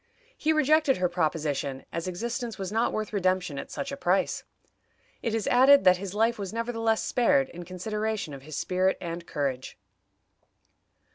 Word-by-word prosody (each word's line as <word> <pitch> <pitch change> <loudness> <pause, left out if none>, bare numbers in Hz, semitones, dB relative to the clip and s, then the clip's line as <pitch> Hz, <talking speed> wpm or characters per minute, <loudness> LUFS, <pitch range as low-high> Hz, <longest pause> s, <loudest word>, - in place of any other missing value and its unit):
He 310 - +1
rejected 310 -2 +3
her 180 0 +2
proposition, 150 -5 -2
as 170 +1 -3
existence 235 +5 -4
was 190 -1 -4
not 225 +2 +1
worth 215 0 -3
redemption 185 -6 0
at - - -7
such 275 - -5
a - - -3
price. 195 -8 0 0.8
It 225 -1 -1
is 225 - -1
added 265 +2 +6
that 185 -1 +6
his 195 +1 -6
life 225 +1 +2
was 195 -2 -4
nevertheless 225 -1 0
spared, 270 +2 +2
in 175 0 -9
consideration 210 0 -3
of 135 - -8
his 150 +2 -8
spirit 185 +1 +1
and 170 0 -6
courage. 135 -3 -3
195 Hz, 160 wpm, -27 LUFS, 175-235 Hz, 0.8 s, added